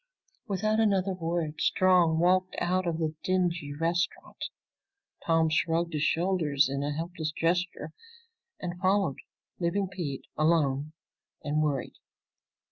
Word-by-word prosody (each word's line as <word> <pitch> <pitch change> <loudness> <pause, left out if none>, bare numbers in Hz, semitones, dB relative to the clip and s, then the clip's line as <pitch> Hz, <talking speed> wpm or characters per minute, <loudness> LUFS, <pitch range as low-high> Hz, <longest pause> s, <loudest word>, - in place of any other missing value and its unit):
Without 215 +2 0
another 195 -3 +2
word 165 -3 -2
Strong 180 -3 +4
walked 185 +2 +2
out 180 +1 0
of 165 -2 0
the 160 -2 -1
dingy 175 -5 0
restaurant. 165 +4 -2 0.8
Tom 165 -1 +4
shrugged 165 +1 +1
his 150 - -1
shoulders 160 -3 +2
in 140 +1 -2
a 145 +1 -1
helpless 160 0 -3
gesture 165 -1 -1 0.7
and 175 -1 -5
followed, 190 -5 +1 0.4
leaving 185 +3 0
Pete 170 -8 -5
alone 155 -2 +1 0.5
and 150 +1 0
worried. 145 -3 -1
170 Hz, 120 wpm, -28 LUFS, 155-185 Hz, 0.8 s, Strong